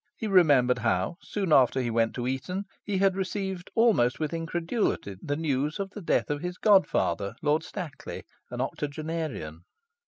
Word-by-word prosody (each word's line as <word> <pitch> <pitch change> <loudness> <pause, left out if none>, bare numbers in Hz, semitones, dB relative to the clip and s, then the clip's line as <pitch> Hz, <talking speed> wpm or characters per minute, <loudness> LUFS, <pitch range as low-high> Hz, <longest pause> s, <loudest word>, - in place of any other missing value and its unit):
He - - -4
remembered 145 -11 +4
how, 110 - 0
soon 195 -6 -1
after 130 -1 +5
he 120 -2 -1
went 115 0 +1
to 120 - -3
Eton, 180 +10 -3 0.2
he 200 -2 -2
had 195 0 +3
received 190 -1 -3
almost 215 - +3
with 155 +1 -2
incredulity 165 - -2
the 145 - -2
news 150 0 -1
of 195 -1 -3
the 205 - -8
death 165 - +1
of 145 0 -2
his 180 +1 -4
god 200 -3 +5
father, 100 +6 -1
Lord 150 +1 +2
Stackley, 170 -3 -7 0.3
an - - -4
octogenarian.... 150 - -4
155 Hz, 165 wpm, -27 LUFS, 125-190 Hz, 0.3 s, after